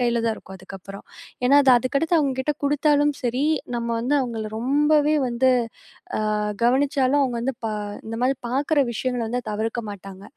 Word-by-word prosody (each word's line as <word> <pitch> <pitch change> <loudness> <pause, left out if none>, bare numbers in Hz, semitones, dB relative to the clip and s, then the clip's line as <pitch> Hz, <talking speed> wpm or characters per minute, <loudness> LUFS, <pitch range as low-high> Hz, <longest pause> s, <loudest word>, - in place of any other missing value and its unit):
கையில 235 -1 +1
தான் 225 -1 +1
இருக்கும் 190 -2 -12
அதுக்கப்புறம். 195 +1 -10 0.4
ஏன்னா 275 +3 +5
அது 265 - +5
அதுக்கடுத்து 280 +8 +1
அவங்க 275 -3 +1
கிட்ட 300 +3 0
குடுத்தாலும் 295 0 +2
சரி, 250 +3 0 0.3
நம்ம 235 0 -2
வந்து 255 +5 0
அவங்களை 225 -4 -3
ரொம்பவே 295 +4 +3
வந்து 245 +2 +2 0.9
அ - - 0 0.3
கவனிச்சாலும், 270 +2 +2
அவங்க 245 -3 -2
வந்து 260 0 -2
ப - - 0 0.4
இந்த 225 +1 -5
மாதிரி 265 0 +1
பார்க்குற 285 +4 +1
விஷயங்களை 245 0 -2
வந்து 245 +2 -2
தவிர்க்க 225 +3 -2
மாட்டாங்க. 195 0 -10
255 Hz, 160 wpm, -23 LUFS, 230-285 Hz, 0.9 s, ஏன்னா